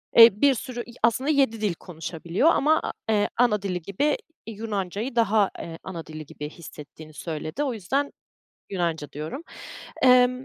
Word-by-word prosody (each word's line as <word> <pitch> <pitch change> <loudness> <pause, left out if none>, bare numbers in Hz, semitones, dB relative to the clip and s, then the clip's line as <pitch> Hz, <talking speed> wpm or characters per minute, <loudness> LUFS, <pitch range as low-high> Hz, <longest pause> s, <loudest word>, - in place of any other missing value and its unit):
Eee, 230 -3 +9
bir 280 -1 +6
sürü 245 0 -5
i 235 - -14
aslında 255 +5 +2
7 265 -7 +2
dil 205 -4 +1
konuşabiliyor 170 - -1
ama 310 +1 +3
a - - -2 0.2
eee, 210 -1 +2
ana 220 -4 +3
dili 180 -3 -2
gibi 280 - 0 0.3
Yunanca'yı 215 +1 -3
daha, 215 -3 +3
eee, 165 -1 -7
ana 170 -4 -6
dili 155 0 -8
gibi 150 +1 -7
hissettiğini 155 -1 -12
söyledi. 155 - -4
O 270 -4 -1
yüzden 270 +8 -1 0.6
Yunanca 170 -6 -2
diyorum. 155 - -5 0.6
Emm, 255 0 +5
210 Hz, 155 wpm, -25 LUFS, 170-250 Hz, 0.6 s, Eee